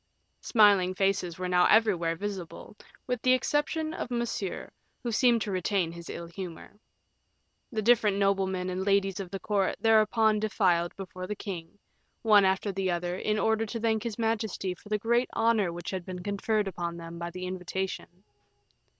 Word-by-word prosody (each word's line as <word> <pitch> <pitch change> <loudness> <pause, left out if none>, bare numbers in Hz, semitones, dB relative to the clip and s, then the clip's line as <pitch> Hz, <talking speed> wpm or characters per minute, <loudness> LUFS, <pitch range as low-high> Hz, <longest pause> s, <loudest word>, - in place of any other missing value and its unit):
Smiling 200 -5 +4
faces 195 -3 0
were 185 0 -3
now 180 0 +4
everywhere 185 -7 +3
visible, 195 +1 -6 0.3
with 250 -2 -2
the 255 - +4
exception 295 +4 0
of 255 - -5
Monsieur, 235 -5 -3 0.3
who 240 - -2
seemed 235 -1 +3
to 205 - -4
retain 185 -2 0
his 170 0 -10
ill 170 - -6
humor. 175 +3 -9 0.9
The 220 -3 -2
different 215 -3 +4
noblemen 190 -2 +1
and 185 +1 -2
ladies 195 -1 +1
of 190 -2 -5
the 195 +1 -5
court 200 -2 0
thereupon 220 -1 +4
defiled 185 -5 +1
before 185 -1 -7
the 210 - -3
king, 185 -2 -7 0.5
one 210 -3 +6
after 190 +2 +1
the 190 -1 -1
other, 175 0 -1
in 210 +3 -1
order 220 +1 +1
to 230 +2 -4
thank 220 -1 +1
his 225 -2 -4
majesty 220 -4 -1
for 195 +4 -16
the 210 - +1
great 235 +3 +1
honor 225 -5 +2
which 175 0 -6
had 190 -2 -4
been 180 0 -7
conferred 205 +1 0
upon 170 -2 -4
them 170 0 -8
by 170 0 -4
the 180 +1 -6
invitation. 185 0 -5
195 Hz, 170 wpm, -28 LUFS, 180-220 Hz, 0.9 s, one